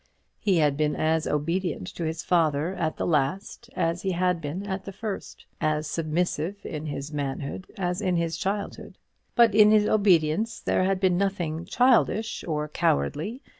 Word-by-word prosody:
He 195 Hz, -4 st, +2 dB
had 150 Hz, -3 st, +2 dB
been 150 Hz, 0 st, +1 dB
as 160 Hz, 0 st, +1 dB
obedient 165 Hz, -, -1 dB
to 170 Hz, -, -5 dB
his 160 Hz, +1 st, -3 dB
father 160 Hz, -1 st, +1 dB
at 160 Hz, -4 st, -2 dB
the -, -, -1 dB
last 170 Hz, -, -1 dB
as 165 Hz, +2 st, 0 dB
he 190 Hz, -1 st, -1 dB
had 180 Hz, -1 st, +1 dB
been 165 Hz, +7 st, -4 dB
at 190 Hz, -1 st, -4 dB
the 195 Hz, -, -6 dB
first; 205 Hz, 0 st, -6 dB, 0.2 s
as 155 Hz, 0 st, +1 dB
submissive 165 Hz, +4 st, -2 dB
in 155 Hz, -1 st, -5 dB
his 145 Hz, +1 st, -5 dB
manhood 140 Hz, +4 st, -4 dB
as 180 Hz, 0 st, -1 dB
in 185 Hz, -3 st, +1 dB
his 165 Hz, -1 st, 0 dB
childhood. 200 Hz, +3 st, -4 dB, 0.4 s
But 235 Hz, -3 st, +5 dB
in 210 Hz, 0 st, +7 dB
his 215 Hz, -1 st, +5 dB
obedience 200 Hz, +1 st, +2 dB
there 185 Hz, -, +1 dB
had 190 Hz, 0 st, +1 dB
been 185 Hz, -2 st, +2 dB
nothing 175 Hz, -5 st, -1 dB
childish 225 Hz, 0 st, +2 dB
or 150 Hz, -2 st, -1 dB
cowardly. 160 Hz, -, -1 dB
175 Hz, 170 wpm, -26 LUFS, 155-195 Hz, 0.4 s, in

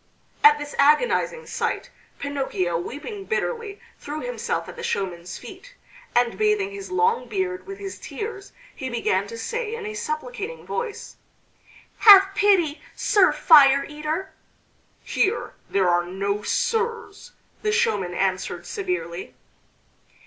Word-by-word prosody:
At 295 Hz, 0 st, +8 dB
this 295 Hz, 0 st, -7 dB
agonizing 390 Hz, -, +3 dB
sight -, -, -3 dB, 0.3 s
Pinocchio, 265 Hz, -12 st, -2 dB
weeping 300 Hz, -, -5 dB
bitterly, 455 Hz, -2 st, -3 dB, 0.2 s
threw 300 Hz, +2 st, -6 dB
himself -, -, -3 dB
at -, -, -9 dB
the 470 Hz, -, -8 dB
showman's 180 Hz, -, -3 dB
feet, -, -, -12 dB, 0.4 s
and 240 Hz, -, +2 dB
bathing 425 Hz, -2 st, +2 dB
his 400 Hz, -1 st, -8 dB
long 445 Hz, +5 st, +1 dB
beard 375 Hz, -2 st, -3 dB
with 390 Hz, 0 st, -7 dB
his 395 Hz, -1 st, -7 dB
tears 415 Hz, -2 st, -7 dB, 0.2 s
he 260 Hz, -3 st, -5 dB
began 205 Hz, -5 st, 0 dB
to 230 Hz, -, -8 dB
say 455 Hz, -, -3 dB
in 455 Hz, -2 st, -7 dB
a 430 Hz, -, -4 dB
supplicating 460 Hz, +1 st, -5 dB
voice: 475 Hz, -3 st, -5 dB, 0.8 s
"Have 390 Hz, -2 st, +9 dB
pity, 375 Hz, -7 st, +3 dB
Sir 395 Hz, -3 st, +4 dB
Fire 280 Hz, -4 st, +6 dB
eater!" 305 Hz, +5 st, -4 dB, 0.7 s
"Here 410 Hz, +4 st, 0 dB, 0.2 s
there 195 Hz, -2 st, +2 dB
are 175 Hz, 0 st, +3 dB
no 200 Hz, +3 st, -2 dB
sirs," 450 Hz, -, -2 dB, 0.3 s
the 425 Hz, -, 0 dB
showman 430 Hz, -, +1 dB
answered 190 Hz, -1 st, -1 dB
severely. 365 Hz, -, -4 dB
380 Hz, 125 wpm, -24 LUFS, -, 0.8 s, Have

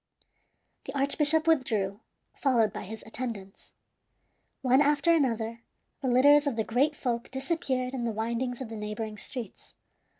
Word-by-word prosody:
The 270 Hz, +1 st, -5 dB
archbishop 300 Hz, +3 st, +2 dB
withdrew, 220 Hz, -11 st, +1 dB, 0.4 s
followed 235 Hz, -7 st, +2 dB
by -, -, -6 dB
his 220 Hz, +3 st, -8 dB
attendants. 225 Hz, -5 st, -6 dB, 0.9 s
One 260 Hz, +2 st, +5 dB
after 295 Hz, +3 st, +3 dB
another 230 Hz, -6 st, 0 dB, 0.4 s
the 270 Hz, -, -2 dB
litters 285 Hz, +4 st, +5 dB
of 275 Hz, -, 0 dB
the 220 Hz, -, 0 dB
great 270 Hz, +8 st, +1 dB
folk 240 Hz, -4 st, -3 dB
disappeared 265 Hz, -2 st, -2 dB
in 255 Hz, -3 st, -3 dB
the 235 Hz, -, 0 dB
windings 235 Hz, +3 st, -2 dB
of 250 Hz, -, -5 dB
the 225 Hz, -, -6 dB
neighboring 210 Hz, 0 st, -5 dB
streets. 245 Hz, -7 st, -4 dB
250 Hz, 140 wpm, -28 LUFS, 225-280 Hz, 0.9 s, One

